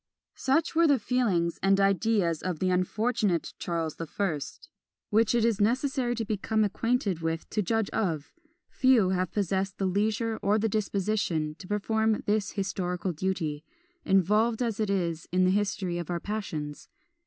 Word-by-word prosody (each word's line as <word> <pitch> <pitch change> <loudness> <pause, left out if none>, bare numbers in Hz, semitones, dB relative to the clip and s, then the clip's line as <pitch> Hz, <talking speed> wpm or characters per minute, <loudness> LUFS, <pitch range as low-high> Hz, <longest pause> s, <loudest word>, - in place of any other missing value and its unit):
" - - -65
Such 275 +5 +1
were 335 0 +4
the 285 -2 +4
feelings 205 -9 0
and 195 +1 +3
ideas 195 -4 +2
of 185 -3 -2
the 185 +3 0
unfortunate 190 0 0
Charles 165 -3 -2
the 165 - -5
First, 160 -6 -3 0.4
which 225 +2 +3
it 230 -1 +3
is 225 -3 +1
necessary 250 +2 +1
to 225 -1 -3
become 215 +1 0
acquainted 210 -3 0
with 165 0 -2
to 210 - +1
judge 220 +2 0
of; 160 -8 -2 0.3
few 255 -8 +3
have 185 -1 0
possessed 195 -1 -1
the 195 - -1
leisure 215 +4 0
or 205 +2 +2
the 220 +1 +1
disposition 200 -6 -1
to 185 - -10
perform 220 +2 0
this 210 -1 0
historical 185 -2 -2
duty, 160 -3 -2 0.4
involved 210 +5 +2
as 225 -3 -2
it 215 -2 0
is 170 -4 -1
in 185 +1 +3
the 185 - +4
history 195 -3 -1
of 175 - -6
our 175 -1 -1
passions. 165 -8 -5
200 Hz, 165 wpm, -28 LUFS, 180-220 Hz, 0.4 s, were